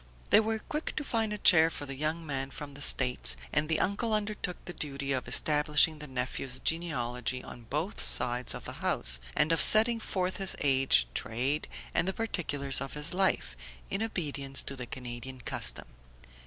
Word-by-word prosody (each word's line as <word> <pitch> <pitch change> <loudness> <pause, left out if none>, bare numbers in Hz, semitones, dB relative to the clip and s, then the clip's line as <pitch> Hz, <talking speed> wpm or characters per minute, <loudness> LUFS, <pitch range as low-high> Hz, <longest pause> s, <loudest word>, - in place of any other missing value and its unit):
They - - +7
were 220 0 -1
quick 300 +8 -5
to 305 - -3
find 225 -5 -1
a 210 - -3
chair 165 -5 +6
for 145 - -6
the 135 - -6
young 155 +4 -3
man 135 -2 -4
from 145 +1 -9
the 140 - -10
States, 125 - 0 0.2
and 150 +2 +1
the 160 - +1
uncle 215 +3 0
undertook 205 -4 -3
the 175 - -7
duty 140 -3 -5
of 130 -2 -2
establishing 150 +1 +3
the 150 - -7
nephew's 130 0 -3
genealogy 125 -7 -1
on 120 -2 -12
both 160 +8 -3
sides 125 0 +2
of - - -9
the - - -6
house, - - +5 0.2
and 155 - +3
of 165 - +3
setting 225 +2 +7
forth 185 -4 -3
his 195 -2 +2
age, 135 - +3
trade 130 +7 -2 0.3
and - - +1
the 190 - -1
particulars 145 - -2
of 135 +1 -6
his 150 +3 -1
life, 180 - 0 0.4
in 195 - -2
obedience 145 -10 0
to 140 - -5
the 125 -2 -8
Canadian 125 +1 -8
custom. 120 - -2
150 Hz, 180 wpm, -29 LUFS, 130-185 Hz, 0.4 s, They